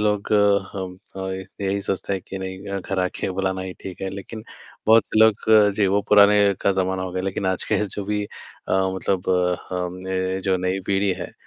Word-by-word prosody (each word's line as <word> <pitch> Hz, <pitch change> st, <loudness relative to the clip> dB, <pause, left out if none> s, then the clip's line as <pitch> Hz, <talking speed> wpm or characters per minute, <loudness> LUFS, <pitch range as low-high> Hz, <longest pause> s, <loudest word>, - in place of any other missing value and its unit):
लोग 105 Hz, 0 st, 0 dB, 0.4 s
हम, 95 Hz, -2 st, -5 dB, 0.2 s
अ, -, -, -5 dB
ये 95 Hz, 0 st, -6 dB, 0.2 s
यही 100 Hz, +1 st, 0 dB
सोचते 95 Hz, 0 st, -2 dB
हैं 95 Hz, -2 st, -2 dB
कि 95 Hz, -, -5 dB
नहीं 95 Hz, 0 st, -5 dB
अ, 100 Hz, 0 st, -3 dB
घर 95 Hz, 0 st, -2 dB
आके 90 Hz, +1 st, -2 dB
बुलाना 95 Hz, 0 st, -1 dB
ही 95 Hz, 0 st, -5 dB
ठीक 95 Hz, 0 st, -8 dB
है। 95 Hz, -, -1 dB
लेकिन 110 Hz, +3 st, -8 dB, 0.4 s
बहुत 110 Hz, -1 st, +6 dB
से -, -, -1 dB
लोग 110 Hz, -2 st, +6 dB, 0.4 s
जी, 105 Hz, -, +3 dB
वो 100 Hz, +2 st, +2 dB
पुराने 105 Hz, 0 st, +7 dB, 0.2 s
का 100 Hz, -, +3 dB
ज़माना 95 Hz, 0 st, -1 dB
हो 95 Hz, -1 st, -5 dB
गया, 95 Hz, 0 st, -2 dB
लेकिन 95 Hz, 0 st, -2 dB
आज 95 Hz, -1 st, 0 dB
के 105 Hz, -, +1 dB
जो 100 Hz, 0 st, -5 dB
भी 105 Hz, 0 st, -1 dB
अ, -, -, -10 dB, 0.2 s
मतलब 95 Hz, 0 st, -1 dB, 0.4 s
हम 90 Hz, -1 st, -3 dB
ने 95 Hz, 0 st, -1 dB
जो 95 Hz, -1 st, +1 dB
नई 95 Hz, +1 st, 0 dB
पीढ़ी 100 Hz, 0 st, +2 dB
है, -, -, -6 dB
95 Hz, 210 wpm, -23 LUFS, 95-100 Hz, 0.4 s, पुराने